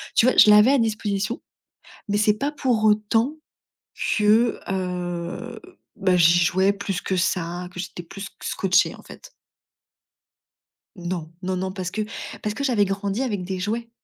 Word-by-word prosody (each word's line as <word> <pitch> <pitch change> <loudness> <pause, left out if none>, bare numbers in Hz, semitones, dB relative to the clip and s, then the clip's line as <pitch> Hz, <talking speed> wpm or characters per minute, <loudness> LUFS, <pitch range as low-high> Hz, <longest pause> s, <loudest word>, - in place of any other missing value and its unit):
tu - - +5
vois, 255 - +2
je - - +8
l'avais 210 +5 +7
à 280 - +4
disposition 215 -1 -1 0.7
mais 205 - +1
c'est 210 0 +3
pas 280 +6 -1
pour 250 -7 0
autant 220 +6 +2 0.8
que, 215 +3 +3
heu, 180 +3 -4 0.4
bah, 190 -3 +2
j'y 170 0 +5
jouais 190 +4 +3
plus 200 -1 -4
que 190 - -2
ça, 180 0 -1
que 180 - -8
j'étais 180 - -7
plus 195 +4 -11
sc 195 - -8
scotchée, 190 0 +1
en - - -16
fait. - - -13 1.7
Non, 175 -3 -5
non, 185 0 -1
non, 190 +1 -3
parce 185 -2 -5
que 215 - -2 0.4
parce 210 - -2
que 280 - -4
j'avais 235 -7 +2
grandi 195 +3 -2
avec 210 -8 -2
des 185 +1 -4
jouets. 225 +5 -3
200 Hz, 160 wpm, -23 LUFS, 180-220 Hz, 1.7 s, je